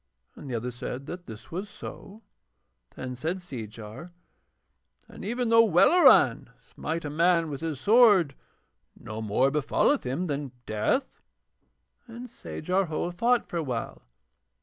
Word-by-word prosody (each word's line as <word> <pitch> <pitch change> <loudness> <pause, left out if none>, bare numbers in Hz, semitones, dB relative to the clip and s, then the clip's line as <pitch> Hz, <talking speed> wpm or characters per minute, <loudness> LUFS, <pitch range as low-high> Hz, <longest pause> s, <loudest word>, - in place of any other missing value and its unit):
And 140 - -10
the 125 - -2
other 120 +2 -3
said 125 +2 -6
that 175 +3 -8
this 110 -1 -11
was 190 +5 -5
so. 215 +2 -10 0.7
Then 130 -1 -6
said 160 +8 -2
Seejar: 115 - -9 1.0
'And - - -11
even 240 +2 -1
though 230 0 +7
Welleran 225 - +5
smite 165 0 -5
a - - -3
man 165 0 +2
with 140 - -6
his 160 -4 -3
sword 205 - +5 0.7
no 110 +1 -7
more 110 +6 +2
befalleth 150 - +1
him 135 +9 -2
than 145 -4 -4
death.' 110 - -1 0.9
Then 235 +1 -9
Sajar 180 - -2
Ho 160 +2 -2
thought 235 +7 +1
for 175 - -4
a 165 - -1
while. 125 -5 -4
160 Hz, 140 wpm, -27 LUFS, 125-195 Hz, 1.0 s, though